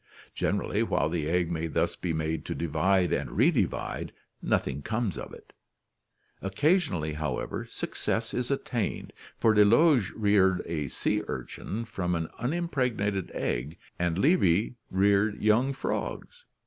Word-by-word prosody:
Generally - - 0
while - - +1
the 80 -2 -2
egg 85 0 +1
may 85 0 -1
thus 80 - 0
be 90 - -3
made 80 0 -2
to - - -3
divide 85 +3 +1
and - - -1
redivide, - - +1 0.3
nothing 70 +1 0
comes 110 - -1
of 65 - -7
it - - -14 0.9
Occasionally, 95 - +1
however, 75 -4 -3
success 115 0 -2
is 125 -1 -1
attained, 125 -5 -2 0.2
for 110 - +4
Delage 115 - +5
' - - -20
reared 100 -3 +3
a 75 -4 -2
sea - - -1
urchin 115 +3 -5
from 90 -6 -2
an 80 -1 -2
unimpregnated 125 - -1
egg7 70 +7 -2 0.2
and 85 -1 0
Levy 105 - +3 0.2
reared 100 +2 +2
young 110 +6 +3
frogs. 485 - -4
95 Hz, 135 wpm, -28 LUFS, 85-115 Hz, 0.9 s, Delage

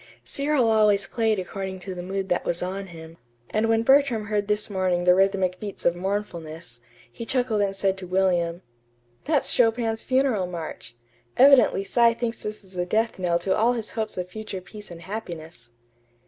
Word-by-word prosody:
Cyril 280 -3 +1
always 210 -2 +4
played 225 -2 0
according 190 +1 -5
to 190 0 -6
the 180 - -6
mood 190 +1 -3
that 180 - +1
was 175 +1 -1
on 195 +2 -4
him; 165 -1 -11 0.3
and 220 +1 +1
when 225 0 +3
Bertram 265 -4 +3
heard 205 -1 -1
this 210 0 0
morning 185 -3 0
the 180 0 +6
rhythmic 190 -1 +1
beats 205 -2 -7
of 175 - +3
mournfulness, 170 - -5 0.3
he 230 - -8
chuckled 240 -3 0
and 195 -1 0
said 195 -1 0
to 185 - -8
William: 180 -2 +1 0.6
"That's 295 -2 +1
Chopin's 225 -2 +2
Funeral 255 -8 +1
March. 160 -9 -7 0.4
Evidently 265 -7 +6
Cy 230 +3 +3
thinks 235 -1 -3
this 210 0 -6
is 190 0 -17
the 180 -1 -2
death 220 +2 0
knell 175 -2 +1
to 190 +2 0
all 230 +3 +3
his 225 -3 -4
hopes 220 -3 -4
of 180 0 -3
future 205 0 -6
peace 205 +3 -12
and 170 -1 -10
happiness." 170 - -8
195 Hz, 180 wpm, -25 LUFS, 180-225 Hz, 0.6 s, the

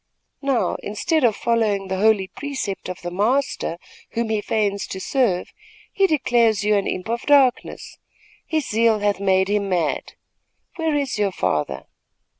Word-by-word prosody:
Now, 275 -4 0
instead 310 +9 -1
of 230 -4 +4
following 215 -5 0
the 190 0 -2
holy 210 -2 +3
precept 260 -8 -5
of 185 - -7
the 175 - -4
Master, 210 -2 0 0.4
whom 230 -1 -1
he 215 -1 0
feigns 205 -2 -1
to 190 - -6
serve, 205 -5 0 0.4
he 390 -1 +3
declares 235 - +2
you 210 0 +3
an 200 - 0
imp 185 +2 -3
of 235 +1 -2
darkness. 275 -4 +2 0.5
His 315 -4 -1
zeal 225 0 +3
hath 205 -1 0
made 190 -1 +2
him 205 -1 0
mad. 170 -5 -1 0.6
Where 320 -2 0
is 275 -6 -1
your 200 -2 +1
father?" 75 - -2
215 Hz, 155 wpm, -22 LUFS, 195-260 Hz, 0.6 s, of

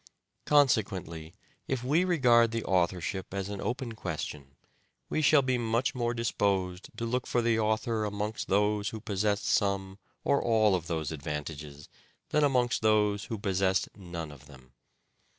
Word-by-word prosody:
Consequently, 95 - +1 0.3
if 130 -2 -2
we 150 +8 +3
regard 125 -10 +4
the 115 0 -3
authorship 95 +1 -1
as 100 0 -3
an 100 -1 -5
open 125 -1 -3
question 75 -8 -6 0.5
we 155 - 0
shall 145 -1 +5
be 130 -1 +1
much 115 +4 0
more 120 -2 -1
disposed 100 -5 -1
to 115 - -2
look 125 +2 -1
for 120 - +1
the 115 -1 +2
author 110 +1 0
amongst 105 +1 -3
those 105 +1 +1
who 110 - -7
possessed 105 -1 -1
some 100 -2 0 0.2
or 140 0 +2
all 110 -3 +3
of 85 -3 -1
those 80 -3 -2
advantages 75 -1 -6 0.4
than 150 - +2
amongst 125 -4 +2
those 105 -2 +2
who 115 - -4
possessed 95 -1 +1
none 85 -5 -7
of 70 -1 -14
them. 65 -3 -16
105 Hz, 150 wpm, -29 LUFS, 90-120 Hz, 0.5 s, shall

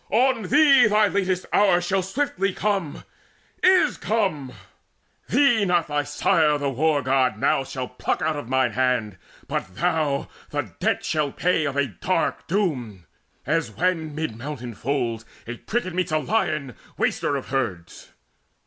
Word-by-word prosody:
On 250 +1 +2
thee 275 -4 +6
Thy 210 0 +4
latest 185 -1 -1
hour 195 -4 +4
shall 190 +2 0
swiftly 195 -2 -1
come 195 -8 -2 0.6
is 370 0 +4
come! 185 - -1 0.8
Thee 240 -2 +4
not 175 -3 +2
thy 145 0 +1
sire 150 0 +2
the 140 -1 -2
War 145 +2 +1
god 130 -3 +1
now 135 - +1
shall 130 -1 -5
pluck 125 - -2
Out 155 0 0
of 145 -5 -6
mine 130 -2 +2
hand, 120 -7 0 0.3
but 95 - -4
thou 155 -4 0 0.2
the 145 -9 -3
debt - - 0
shalt 150 -3 -1
pay 175 -3 +1
Of 140 -2 -2
a 140 - +3
dark 105 -10 -2
doom, 130 - -2 0.4
as 165 +4 0
when 165 -4 -1
mid 155 -7 -3
mountain 125 -1 -6
folds 120 -2 -2 0.2
A 120 +1 -6
pricket 215 - -3
meets 180 -2 -1
a 155 - +2
lion, 155 - -1 0.2
waster 145 - 0
of 135 - -5
herds. 105 -11 -4
155 Hz, 150 wpm, -23 LUFS, 130-190 Hz, 0.8 s, thee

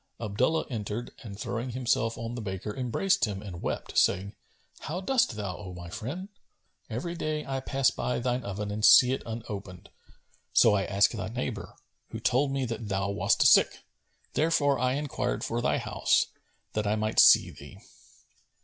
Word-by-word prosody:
Abdullah 120 +9 0
entered 110 +1 -4
and 100 -4 -9
throwing 120 +3 -3
himself 120 -2 0
on 115 +1 -5
the 120 - -5
baker 100 +1 -5
embraced 130 +9 +1
him 100 -2 -5
and 90 -4 -8
wept, - - -1
saying, 100 +3 +1 0.5
"How 170 +4 -4
dost 255 +6 +1
thou, 100 -4 -4
O 90 -3 -9
my 85 -1 -9
friend? 155 - -6 0.6
Every 125 +10 -4
day, 155 -2 -3
I 135 -1 -2
pass 135 0 +1
by 125 - -2
thine 125 +1 -1
oven 100 0 -4
and 105 +1 -4
see 125 +2 +8
it - - -3
unopened; 105 -5 -7 0.6
so 115 - +6
I 100 -2 +1
asked 100 +3 +2
thy 95 -4 -4
neighbour, 120 -1 -5 0.3
who - - -6
told 135 +3 +1
me 135 -1 -1
that 115 -2 -5
thou 95 0 -1
wast 100 - +2
sick; - - +5 0.5
therefore 145 -4 +2
I 125 +1 +1
enquired 135 -3 -2
for 115 +1 -2
thy 125 - +1
house, - - +1 0.5
that 105 -1 -1
I 105 - +2
might 110 0 0
see - - +7
thee." - - -13
115 Hz, 170 wpm, -28 LUFS, 105-130 Hz, 0.6 s, see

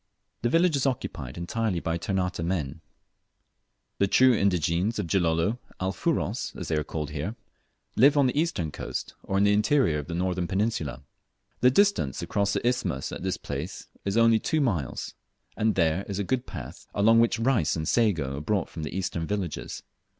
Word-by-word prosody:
The 120 - +1
village 165 +2 +3
is 140 0 +1
occupied 70 - -4
entirely 95 +2 -1
by 85 0 -1
Ternate 90 -3 -1
men. 80 -4 -2 1.2
The 100 - +4
true 130 +5 +5
indigenes 95 0 +1
of 105 - -1
Gilolo, 85 +5 +1 0.2
"Alfuros" 95 +1 -1
as - - -6
they - - 0
are - - +2
here - - -2
called, 75 -2 -4 0.8
live 140 +5 +6
on 140 - +5
the 125 - +1
eastern 145 - 0
coast, - - -5
or 95 - -2
in 100 - +4
the 100 0 +4
interior 105 - +3
of 75 - -7
the 85 - -4
northern 90 0 -1
peninsula. 95 - -1 0.6
The 125 - +6
distance 135 - +2
across 100 -1 0
the - - -2
isthmus 95 - -1
at - - -6
this 95 0 -1
place - - -6
is 100 +2 -1
only 115 -1 +5
two 160 - 0
miles, 95 - -1 0.4
and 110 0 +1
there, 85 +1 +2
is 100 - -3
a 100 - 0
good 125 +6 -1
path, - - -8
along 115 +3 +5
which 115 0 +3
rice 115 - +2
and 80 -1 -3
sago 85 - +1
are - - -6
brought 100 +5 0
from 80 - -7
the 75 +4 -4
eastern 85 -3 -2
villages. 100 -6 -4
95 Hz, 180 wpm, -27 LUFS, 85-115 Hz, 1.2 s, live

